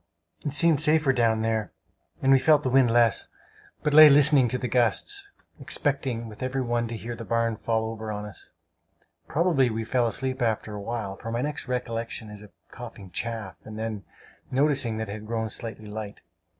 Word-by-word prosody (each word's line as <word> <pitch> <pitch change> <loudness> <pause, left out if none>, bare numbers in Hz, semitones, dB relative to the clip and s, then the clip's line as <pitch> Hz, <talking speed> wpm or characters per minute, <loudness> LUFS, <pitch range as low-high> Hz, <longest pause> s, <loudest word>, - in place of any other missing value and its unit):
It 145 - -3
seemed 160 -1 +3
safer 155 -3 +3
down 115 -2 +2
there, 110 -1 -1 0.5
and 135 - +4
we 135 - +7
felt 150 +1 +4
the 130 - -1
wind 130 -2 +5
less, 115 -2 +3 0.6
but 150 - +1
lay 155 0 +10
listening 140 -2 +5
to 125 - -2
the 125 - -3
gusts 395 - +1 0.3
expecting 130 -5 -1
with 105 -1 -12
every 130 +1 -1
one 120 -1 -1
to 115 0 -5
hear 120 +2 -6
the 115 - -8
barn 115 0 0
fall 110 +1 -1
over 110 -1 -5
us. 105 -1 -7 0.8
Probably 155 -6 +2
we 110 0 -3
fell 120 0 +1
asleep 130 +2 -3
after 110 -2 -1
a 105 - -6
while; 105 -3 -4
for 115 - -6
my 120 +2 -1
next 150 -2 -4
recollection 115 -3 -4
is 105 -1 -10
of 105 - -13 0.2
coughing 110 -7 -10
chaff, 110 -3 -4
and 110 0 -9
then 110 -2 -4 0.5
noticing 135 -4 +1
that 110 0 -3
it 100 - -5
had 110 0 -8
grown 110 -1 -2
slightly 110 -2 -5
light. 105 -1 -7
115 Hz, 190 wpm, -26 LUFS, 110-135 Hz, 0.8 s, lay